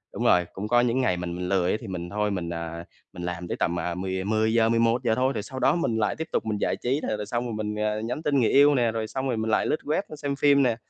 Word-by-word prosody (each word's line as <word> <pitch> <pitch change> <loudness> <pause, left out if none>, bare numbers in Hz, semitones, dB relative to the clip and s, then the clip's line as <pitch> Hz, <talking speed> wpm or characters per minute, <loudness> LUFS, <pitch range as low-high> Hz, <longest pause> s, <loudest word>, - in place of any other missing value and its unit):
đúng - - -2
rồi, 90 -1 +4
cũng 100 +3 -5
có 120 +1 +4
những 125 +2 +1
ngày 90 -7 +1
mình 90 0 -4
mình 90 0 -4
lười 95 -2 +2
á, - - +1
thì 115 - -8
mình 90 -2 -5
thôi, 105 0 -1
mình, 90 -3 -3
à, 85 0 -5 0.3
mình 90 - -7
làm 90 0 -4
tới - - -3
tầm, 85 0 0
à, 85 +1 -2
mười 95 0 -3
mười 110 +2 +1
giờ, 115 -1 +4
11:00 115 0 +2
thôi, 130 +2 +1
rồi 105 - -3
sau 130 +3 -7
đó - - +3
mình 115 -10 0
lại 105 -1 0
tiếp 160 - -4
tục - - -1
mình 105 -1 -1
giải - - +1
trí. 130 +4 -1
Là - - -1
là 105 - -4
xong 120 +3 -2
rồi 115 - -4
mình, 105 0 -3
ờ, 105 0 -1
nhắn 125 +8 -4
tin 140 -2 +2
người 115 - +3
yêu 145 +1 +6
nè, 120 -3 +2
rồi 110 -1 -3
xong 135 +3 -3
rồi 120 -3 -1
mình 110 0 -1
lại - - +2
lướt 155 - 0
web, 155 +6 0
a, 155 - -7
xem 145 -2 -3
phim 140 -1 +4
nè. 120 -3 +2
110 Hz, 315 wpm, -26 LUFS, 95-125 Hz, 0.3 s, yêu